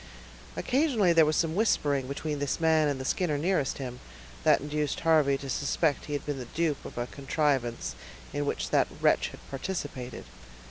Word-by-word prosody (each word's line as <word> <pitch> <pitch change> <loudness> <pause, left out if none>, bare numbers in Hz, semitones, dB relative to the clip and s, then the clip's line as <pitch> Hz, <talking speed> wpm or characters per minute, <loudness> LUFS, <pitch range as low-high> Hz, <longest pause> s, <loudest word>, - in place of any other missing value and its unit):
Occasionally 250 - +2
there 165 -2 +6
was 155 - +1
some 160 0 +1
whispering 145 - +1
between 145 +2 -3
this 145 +2 -1
man 160 -2 +4
and 140 -2 -1
the 130 - -5
Skinner 155 0 0
nearest 155 -3 0
him, 125 -2 -6 0.4
that - - +5
induced 150 0 -2
Harvey 155 -4 +4
to 140 - -8
suspect 145 +3 0
he 150 - -5
had 145 - -3
been 145 -2 -3
the 125 - -5
dupe 160 -4 0
of - - -9
a 120 - -1
contrivance 135 -3 -1 0.4
in 145 0 -1
which - - -2
that - - +4
wretch - - +3
had - - -11
participated. 135 -4 -5
145 Hz, 180 wpm, -29 LUFS, 135-160 Hz, 0.4 s, there